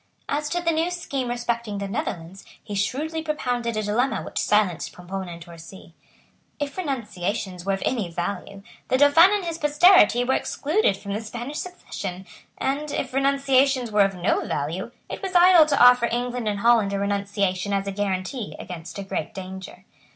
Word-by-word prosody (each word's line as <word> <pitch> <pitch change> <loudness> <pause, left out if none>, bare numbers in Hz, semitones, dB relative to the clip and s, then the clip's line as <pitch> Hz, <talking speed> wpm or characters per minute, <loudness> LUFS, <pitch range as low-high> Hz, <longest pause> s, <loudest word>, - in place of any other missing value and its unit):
As 295 +1 -1
to 350 +2 -2
the 335 - +2
new 325 +2 0
scheme 280 -8 -3
respecting 235 -3 -2
the 200 0 -3
Netherlands, 185 -2 -5 0.2
he 210 - -7
shrewdly 290 +11 -2
propounded 245 -7 -2
a 215 - -1
dilemma 235 +6 0
which - - -4
silenced 205 -5 +1
Pomponne 185 +1 -6
and 170 -1 -8
Torcy. 170 +1 -12 0.7
If 285 -1 -3
renunciations 205 - -3
were 195 - +1
of 195 - -3
any 220 -9 -1
value, 195 +3 -5 0.2
the 255 - +2
Dauphin 290 +6 +7
and 410 -3 0
his 335 -1 -4
posterity 295 - +5
were 260 +2 +1
excluded 300 - 0
from 200 0 -6
the 210 - -2
Spanish 240 +6 -6
succession; 195 - -6 0.3
and, 290 +3 -2
if 260 -2 -3
renunciations 270 -2 +2
were 210 0 +4
of 195 -1 +2
no 180 +1 0
value, 165 +10 -3 0.2
it - - -7
was 380 -2 -5
idle 350 -3 +7
to 285 -2 +1
offer 245 -1 +6
England 245 -1 -2
and 205 -1 -1
Holland 225 -4 +4
a - - 0
renunciation 200 -1 -1
as 195 0 0
a 200 - -3
guarantee 200 +3 -3
against 175 -1 -8
a 200 - -4
great 190 -4 -4
danger. 190 0 -8
225 Hz, 175 wpm, -24 LUFS, 195-280 Hz, 0.7 s, Dauphin